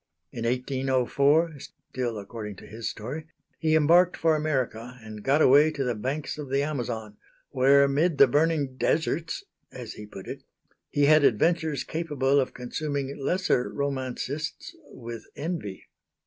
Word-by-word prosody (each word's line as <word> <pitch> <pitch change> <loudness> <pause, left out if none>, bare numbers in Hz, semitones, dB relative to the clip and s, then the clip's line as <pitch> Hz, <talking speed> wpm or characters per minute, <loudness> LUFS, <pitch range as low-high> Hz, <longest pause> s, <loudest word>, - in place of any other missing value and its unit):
In 115 - -5
1804 135 +5 +1
(still 125 -3 -5
according 105 0 -7
to - - -13
his 110 +1 -5
story), 135 +9 -6 0.3
he 160 -1 +2
embarked 170 +4 +5
for 160 -1 +3
America 125 -5 -2
and 110 -1 -9
got 140 +7 +3
away 145 +4 +6
to 145 -3 -3
the 125 -2 0
banks 135 +8 -4
of 145 -3 -6
the 135 +1 +1
Amazon, 115 -7 -4 0.3
where 140 +1 +5
amid 145 +4 +2
the 140 - +9
burning 145 -1 +1
deserts 165 - 0 0.3
(as 120 -4 -8
he 105 - -10
put 95 -2 -10
it) - - -6 0.5
he 145 - +2
had 155 +1 +6
adventures 155 +4 +2
capable 145 -4 0
of 130 - -2
consuming 140 +2 -3
lesser 180 -7 +1
romancists 140 - -4 0.2
with 115 -3 -9
envy. 150 - -5
140 Hz, 145 wpm, -26 LUFS, 125-155 Hz, 0.5 s, the